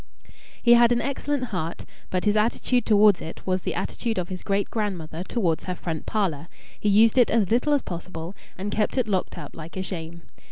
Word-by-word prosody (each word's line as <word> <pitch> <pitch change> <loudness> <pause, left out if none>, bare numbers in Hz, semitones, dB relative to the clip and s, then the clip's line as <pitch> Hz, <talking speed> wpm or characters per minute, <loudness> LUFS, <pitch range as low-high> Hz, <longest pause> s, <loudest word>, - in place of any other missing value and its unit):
He 240 - +6
had 240 0 +6
an 240 - +3
excellent 280 +1 -2
heart, 170 -2 -3 0.2
but 185 +1 -1
his 210 0 +3
attitude 235 +2 +1
towards 210 -3 +5
it 160 - -8
was 185 0 0
the - - -3
attitude 230 -3 -2
of 175 -1 -2
his 185 -1 -5
great 200 0 -1
grandmother 180 -7 -3
towards 185 -6 -1
her 180 - -3
front 165 -3 -5
parlour 175 -8 -1 0.3
he 210 - +1
used 220 +4 +5
it 245 - +5
as 220 -4 +2
little 250 +6 +3
as 285 - +2
possible, 170 0 -6 0.2
and 200 +2 -4
kept 215 +5 0
it 250 -3 +2
locked 190 -3 -1
up - - -8
like 165 +3 -9
a 185 - -1
shame. 170 -2 -6
200 Hz, 205 wpm, -25 LUFS, 175-230 Hz, 0.3 s, He